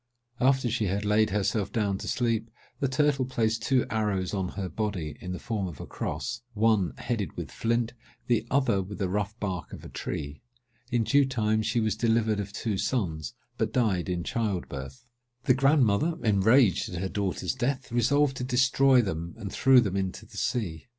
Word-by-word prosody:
After 130 0 +3
she 115 -1 0
had 100 +2 -1
laid 105 +1 +3
herself 105 0 0
down 100 -4 0
to - - -6
sleep, 115 -2 0 0.3
the 140 - +1
turtle 135 +1 +2
placed 115 -3 0
two 130 -2 +2
arrows 105 -4 0
on 95 -3 -1
her 95 -2 -2
body, 95 -7 -3
in 90 - -5
the 90 - -3
form 105 -3 -3
of 80 -6 -9
a - - -6
cross—one 110 -5 -1
headed 105 -9 -3
with - - -5
flint, 115 0 0 0.3
the 115 -3 +2
other 125 -7 +2
with 95 +2 -7
the 95 - -1
rough 105 +3 -2
bark 95 -5 -4
of - - -9
a - - -8
tree. 70 +1 -5 0.5
In 120 -2 +1
due 140 +5 +4
time 110 -4 +1
she 115 - 0
was 110 -1 +1
delivered 110 -1 +1
of 100 -1 -4
two 100 -1 -2
sons, 80 - -2 0.2
but - - 0
died 100 -8 +1
in 90 -1 -1
child 110 -5 -2
birth. 70 - -8 0.4
The 130 - +4
grandmother, 135 +1 +3
enraged 110 +1 +4
at 90 - -5
her 95 - -1
daughter's 95 +3 -2
death, 130 0 -2
resolved 135 +3 +2
to - - -3
destroy 130 0 +4
them, 85 -3 -4
and 100 -2 -6
threw 130 -1 +6
them 100 -4 -2
into 95 -1 -3
the - - -13
sea. 90 -9 -2
110 Hz, 185 wpm, -28 LUFS, 95-125 Hz, 0.5 s, threw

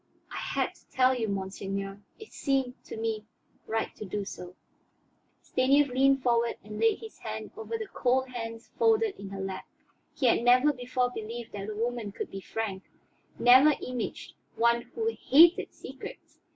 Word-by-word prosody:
I - - -5
had - - -1
to - - -25
tell 255 0 +4
you, 235 -3 -1
monseigneur; 195 0 -4 0.2
it 435 -1 -13
seemed 270 -2 0
to - - -7
me 220 -1 -2 0.4
right 225 0 -2
to - - -6
do 205 0 -3
so." 180 -1 -8 0.9
Stanief 275 +2 +3
leaned 270 +1 +3
forward 235 -1 +2
and 210 +1 -8
laid 225 0 +3
his 445 -1 -10
hand - - -6
over 450 +1 -4
the 440 - -4
cold 260 -8 0
hands 230 -2 -7
folded 450 -2 +4
in 200 - -7
her 195 0 -7
lap. 190 0 -5 0.5
He 265 - 0
had 235 - +4
never 250 +5 +5
before 250 -1 -1
believed 230 +1 -6
that 200 0 -5
a 215 - -5
woman 230 -1 -2
could - - -6
be 195 - -6
frank, 200 -2 -4 0.6
never 260 +5 +7
imaged 250 -2 -5 0.2
one 235 +1 +3
who 450 - -5 0.2
"hated 335 +7 +7
secrets." - - -10
240 Hz, 165 wpm, -29 LUFS, 215-265 Hz, 0.9 s, never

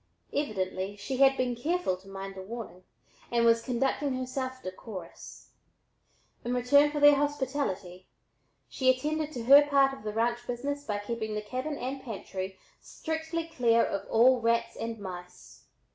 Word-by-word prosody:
Evidently 195 -7 -2
she 205 +6 -4
had 270 0 +5
been 250 -1 0
careful 320 - 0
to 185 +2 -18
mind 195 0 -7
the 190 - -8
warning 205 -3 -8 0.5
and 235 -1 +2
was 230 0 +5
conducting 265 +3 0
herself 255 0 -3
"decorus." 185 -1 -9 0.9
In 245 +1 -1
return 285 +4 +5
for 295 0 -3
their 290 0 +8
hospitality 265 -11 -2 0.6
she 260 -1 +1
attended 300 +4 0
to 240 - -5
her 280 +4 +9
part 275 -2 +3
of 270 - -10
the 210 0 -4
ranch 235 +2 0
business 280 +4 -3
by 210 -2 -2
keeping 220 +1 -4
the 210 - -2
cabin 260 +7 -4
and 265 +2 -4
pantry 190 -5 -6 0.2
strictly 320 +1 -4
clear 240 -8 +3
of 195 0 -4
all 245 +2 +5
rats 230 0 +1
and 230 0 -4
mice. 180 -2 -10
240 Hz, 155 wpm, -29 LUFS, 205-275 Hz, 0.9 s, her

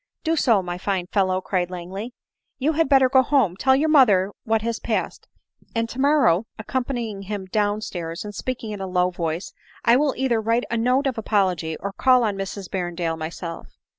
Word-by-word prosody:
" - - -57
Do 325 0 +1
so, 230 -10 +3
my 175 0 -5
fine 190 -2 -1
fellow," 185 -2 +1
cried 180 -2 -1
Langley; 190 +7 -7 0.2
" - - -55
you 285 +4 +1
had 320 -2 +1
better 270 -2 +6
go 260 0 +5
home, 260 -9 +2
tell 265 +6 +3
your 295 +4 +2
mother 210 -10 +5
what 220 -1 +1
has 230 0 -2
passed, - - -3 0.5
and 230 0 0
tomorrow, 255 - +2
(accompanying 235 -2 -3
him 195 0 -5
down 205 +2 0
stairs, 170 -2 -5
and 205 - -7
speak 255 +3 -4
ing 220 - -5
in 205 -2 -6
a 190 - -3
low 180 0 +1
voice,) 170 +1 -4 0.3
I 235 +1 +6
will 285 0 +1
either 245 -4 +1
write 230 +3 +1
a - - +1
note 250 +5 +2
of 260 -4 -1
apology 185 -7 0
or 200 0 -5
call 255 +1 +4
on 210 -3 0
Mrs 195 0 -5
Berrendale 175 -3 -2
myself." 165 +1 -7
210 Hz, 200 wpm, -23 LUFS, 185-255 Hz, 0.5 s, better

